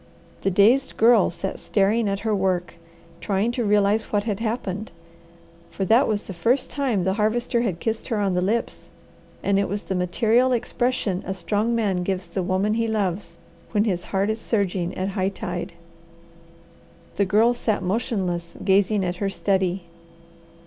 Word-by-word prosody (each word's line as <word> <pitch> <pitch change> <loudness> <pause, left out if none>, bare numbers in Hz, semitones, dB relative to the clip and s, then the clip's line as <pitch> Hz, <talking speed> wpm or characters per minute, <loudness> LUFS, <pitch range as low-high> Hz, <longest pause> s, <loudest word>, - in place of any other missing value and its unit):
The - - +1
dazed 220 +8 +3
Girl 225 -2 +5
sat 180 +3 -5
staring 210 +2 +1
at 195 0 -2
her 220 -1 0
work, 185 -2 0 0.5
trying 200 +5 0
to 240 0 -2
realize 205 +1 +2
what 205 -1 -1
had 210 -2 -2
happened; 220 -3 -3 0.8
for 195 - -3
that 230 +7 +4
was 210 -2 -1
the 195 - -7
first 235 +10 +1
time 255 -10 0
the 190 +1 +1
Harvester 235 +3 0
had 195 -8 -2
kissed 225 +3 -3
her 230 - -1
on 200 -2 +1
the 180 - +1
lips, 220 +5 -2 0.5
and 200 0 +2
it 200 - 0
was 205 +2 -3
the - - -3
material 225 +8 +2
expression 235 -5 -1
a 190 - -4
strong 210 +6 0
man 205 -5 +1
gives 185 0 -2
the 190 - -3
woman 190 +3 0
he 230 0 0
loves 195 -5 -2 0.4
when 210 -1 +3
his 185 -5 -1
heart 195 +2 0
is 220 +1 -4
surging 190 -6 -1
at 185 +1 -1
high 190 -1 0
tide. 180 -3 -5 1.4
The 200 - +3
Girl 215 +5 +4
sat 220 -3 -1
motionless, 180 -4 -2
gazing 195 0 +3
at 180 0 -2
her 200 0 -1
study. 190 -2 0
200 Hz, 170 wpm, -23 LUFS, 190-225 Hz, 1.4 s, Girl